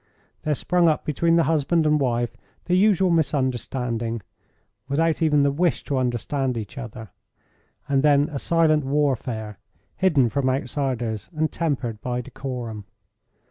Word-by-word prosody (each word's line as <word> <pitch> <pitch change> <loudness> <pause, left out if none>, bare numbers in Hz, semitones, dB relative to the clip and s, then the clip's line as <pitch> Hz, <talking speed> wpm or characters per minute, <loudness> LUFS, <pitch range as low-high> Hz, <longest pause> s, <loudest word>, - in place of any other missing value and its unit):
There 150 -1 0
sprung 175 +4 +2
up 155 - +1
between 165 +2 +2
the 165 - +4
husband 160 +1 +1
and 150 0 +3
wife 120 -3 0 0.3
the 180 - 0
usual 190 -2 +4
misunderstanding, 125 -6 -1 0.7
without 160 +4 +1
even 150 -3 +4
the 140 - +3
wish 170 +3 0
to 140 - -2
understand 130 +1 -1
each 110 +1 -6
other, 115 -6 -8 0.8
and 140 -1 +2
then 145 0 +4
a 145 -3 -4
silent 160 -2 +2
warfare, 130 -7 -1 0.4
hidden 155 -10 +3
from 135 +1 0
outsiders 125 -5 -2
and 155 0 0
tempered 130 -9 -2
by 125 0 -2
decorum. 120 -5 -6
140 Hz, 140 wpm, -24 LUFS, 120-155 Hz, 0.8 s, the